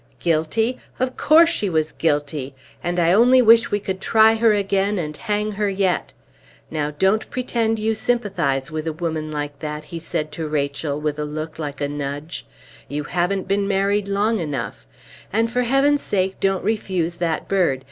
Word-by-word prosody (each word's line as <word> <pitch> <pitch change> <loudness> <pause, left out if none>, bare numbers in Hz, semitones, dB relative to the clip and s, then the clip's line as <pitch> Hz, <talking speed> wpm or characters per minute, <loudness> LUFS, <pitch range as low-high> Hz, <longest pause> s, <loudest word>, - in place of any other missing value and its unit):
Guilty? 175 +9 0 0.2
Of 255 0 -1
course 330 +2 +6
she 210 - -1
was 160 -2 0
guilty; 145 -3 -1 0.3
and 175 +1 -1
I 170 0 +4
only 245 +5 +6
wish 230 -1 +6
we 205 - 0
could 190 -1 -4
try 220 0 +5
her 225 0 +4
again 200 0 +1
and 150 -4 -3
hang 210 +1 -2
her 210 0 -1
yet! 190 -2 0 0.6
Now 150 -2 -1
don't 190 +8 +1
pretend 230 -3 0
you 220 +1 0
sympathize 175 - -1
with 155 0 -4
a 160 - -1
woman 160 -1 -3
like 145 -1 -4
that," 150 0 -5
he 165 +2 -7
said 155 -2 -3
to 155 +1 -4
Rachel, 145 0 -2
with 150 0 -2
a - - -1
look 155 +2 -5
like 145 -2 -5
a 145 - +1
nudge; 145 +2 -5 0.4
"you 145 +1 -3
haven't 180 +5 -1
been 200 0 +1
married 200 +1 +1
long 205 +3 +1
enough; 140 - -4 0.4
and 225 +2 +1
for 250 +1 +1
Heaven's 275 +4 +3
sake 190 -1 -1
don't 195 -1 +1
refuse 185 -6 -1
that 165 -2 -1
bird! 180 -9 +2
180 Hz, 180 wpm, -22 LUFS, 150-215 Hz, 0.6 s, course